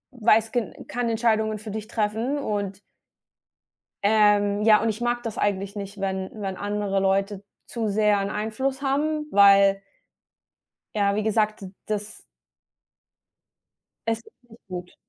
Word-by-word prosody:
weiß 225 -1 +3
ge 240 -3 -2
kann 245 -1 -2
Entscheidungen 220 -1 +1
für 215 0 -8
dich 215 0 -5
treffen 225 +5 -1
und 200 -6 -3 1.2
Ähm, 205 -1 +3
ja, 215 -1 +6
und 225 - +1
ich 220 +1 -3
mag 240 0 0
das 225 -3 -5
eigentlich 200 0 -1
nicht, 200 0 -7
wenn 190 -1 -2
wenn 195 -3 -4
andere 205 -1 -1
Leute 195 +1 0 0.2
zu 230 -2 -3
sehr 210 0 +3
'n 195 +1 -2
Einfluss 265 +6 -2
haben, 300 +2 0
weil 195 -1 +6 1.1
ja, 200 -1 +2
wie 215 - 0
gesagt, 215 0 +1
d 190 - -8
das 210 0 -4 1.9
es 225 0 +1
ist - - -20 0.2
nicht 225 +2 -17
gut. 180 -1 -7
210 Hz, 140 wpm, -24 LUFS, 200-225 Hz, 1.9 s, ja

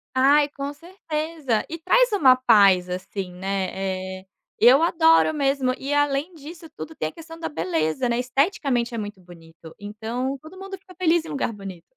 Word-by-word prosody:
Ai 285 +3 +4
com 285 0 -6
certeza 310 - -3
e 330 - -5
traz - - +3
uma 270 -11 +6
paz 200 -7 +4
assim, 185 +1 -5
né, 190 +1 -3 0.5
eh, - - -25 0.3
eu 255 +6 +6
adoro 325 -1 +4
mesmo 275 -3 +1
e 275 +2 -4
além 290 +3 0
disso 325 +2 -11
tudo 320 - -8
tem 155 - -3
a - - -13
questão 325 - -12
da 325 - -3
beleza, 170 - -1
né, 235 - 0
esteticamente 250 -2 0
é - - -4
muito 205 -3 -6
bonito 165 -2 -15
então 230 +6 -4
todo 320 +5 -13
mundo 390 0 -8
fica 370 -1 -17
feliz 340 -2 +2
em 320 - -9
lugar 275 -6 -2
bonito. 190 -4 -10
270 Hz, 175 wpm, -23 LUFS, 205-320 Hz, 0.5 s, uma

